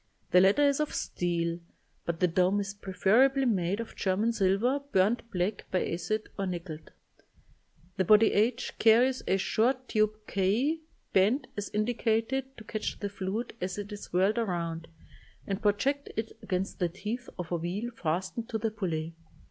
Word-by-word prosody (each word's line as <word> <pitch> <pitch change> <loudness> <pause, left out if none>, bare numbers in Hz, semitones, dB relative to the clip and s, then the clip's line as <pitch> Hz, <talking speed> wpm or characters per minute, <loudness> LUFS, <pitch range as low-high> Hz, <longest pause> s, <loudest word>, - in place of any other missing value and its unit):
The 180 - +7
latter 195 +10 +5
is 280 0 +2
of 300 - -1
steel, 170 -1 -1 0.5
but 170 -1 -2
the 180 - +4
dome 185 +4 +2
is 195 -1 -3
preferably 225 +8 +3
made 195 -3 +1
of 230 - -6
German 205 +5 +1
silver 210 +7 +2
burnt 215 +5 +2
black 190 0 -2
by 185 - 0
acid 210 +6 -2
or 195 - 0
nickeled. 170 -3 -6 1.1
The 190 - +3
body 215 +4 +6
h 225 +4 0
carries 245 +4 +5
a 190 - +3
short 250 +7 +1
tube 215 -1 0
k 220 - +1 0.3
bent, 220 +9 +3
as 205 -1 -4
indicated, 235 +4 0
to 220 - -10
catch 215 0 -4
the 205 - -3
fluid 200 +4 -4
as 185 +1 -3
it 205 0 -6
is 205 0 -8
whirled 195 +6 +2
around, 170 -6 -2 0.6
and 195 +1 -3
project 265 +7 +1
it 220 0 -2
against 190 +1 -2
the 175 -2 +1
teeth 210 +8 -5
of 180 -2 -6
a 175 - +1
wheel 190 +8 -3
fastened 185 +6 -2
to 220 - -1
the 220 0 -1
pulley. 165 -6 -3
205 Hz, 165 wpm, -29 LUFS, 185-230 Hz, 1.1 s, The